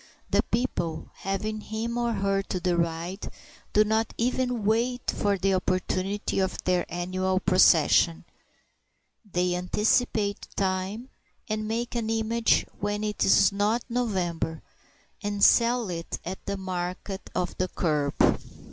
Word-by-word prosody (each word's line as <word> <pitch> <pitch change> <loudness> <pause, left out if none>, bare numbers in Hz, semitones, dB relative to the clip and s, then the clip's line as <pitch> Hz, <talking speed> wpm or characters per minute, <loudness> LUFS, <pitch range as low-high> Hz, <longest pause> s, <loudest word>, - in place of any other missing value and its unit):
The - - +4
people, 175 -9 -2
having 215 +3 -3
him 225 +2 -4
or 240 -1 0
her 195 -1 +1
to 190 -1 -4
deride, 170 +1 -1 0.4
do 210 - +5
not 220 +1 0
even 245 -2 0
wait 235 +3 +1
for 200 -1 0
the 195 +1 +1
opportunity 185 +2 -1
of 190 -1 0
their 180 -1 +1
annual 185 +2 -1
procession. 170 -3 +4 1.1
They 180 0 +1
anticipate 205 +3 +1
time, 195 +5 -2 0.4
and 215 0 -2
make 235 +2 -2
an 230 -2 -2
image 225 +1 +2
when 205 +1 -2
it 210 -1 -1
is 195 - +5
not 210 +4 +1
November, 180 -9 -1 0.6
and 205 -1 -2
sell 235 -1 +5
it 165 -1 -4
at 185 +2 -5
the 200 0 -2
market 185 +1 -4
of 180 -1 -1
the 185 - +1
kerb. 150 -6 0
200 Hz, 130 wpm, -27 LUFS, 180-220 Hz, 1.1 s, do